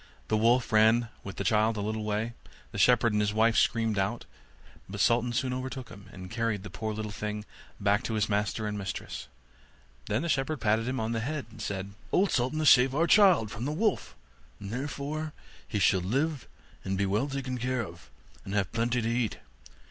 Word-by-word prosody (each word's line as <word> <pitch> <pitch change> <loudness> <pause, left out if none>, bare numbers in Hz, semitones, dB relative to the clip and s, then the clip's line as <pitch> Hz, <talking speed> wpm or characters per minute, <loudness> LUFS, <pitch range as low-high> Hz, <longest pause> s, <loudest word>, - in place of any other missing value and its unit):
The 110 - +2
wolf 120 +2 +3
ran 110 +2 +5
with 95 - -7
the - - -3
child 110 0 +2
a - - -1
little 110 +1 -2
way; 105 +2 -2 0.4
the - - -5
shepherd 120 -2 +4
and 105 - +2
his 105 0 0
wife 110 +1 +4
screamed 115 -3 +2
out; 95 0 -1 0.6
but 100 +1 -6
Sultan 120 +2 +3
soon 125 +2 -1
overtook 130 0 -5
him, 100 -1 -13
and 90 -1 -10
carried 115 -4 -1
the 105 - -8
poor 110 -1 -3
little 105 0 -4
thing 105 0 -4 0.3
back 100 +1 +2
to 110 - -2
his 105 -1 +1
master 105 +1 -1
and 105 -1 -3
mistress. 95 - -5 0.8
Then 110 +8 0
the - - -1
shepherd 140 +1 0
patted 110 +1 +1
him 130 +1 -1
on 110 +1 -1
the 115 - -1
head, 140 +5 -3
and - - -11
said, 100 0 -4 0.2
'Old 195 +1 +3
Sultan 130 +4 0
has 155 -1 +5
saved 130 +1 +5
our 165 +3 +3
child 175 - +5
from 115 +3 -5
the 145 - -1
wolf, 205 +6 0 0.4
and 100 0 -7
therefore 145 +4 -4 0.3
he 110 - -2
shall 95 -1 +3
live 135 - -1 0.4
and 95 0 -2
be 100 - +1
well 105 +8 +1
taken 135 -2 -4
care 125 0 -1
of, 85 -5 -13 0.3
and 95 - -5
have 100 -4 0
plenty 120 +1 0
to - - 0
eat. 115 -1 0
115 Hz, 205 wpm, -29 LUFS, 105-130 Hz, 0.8 s, ran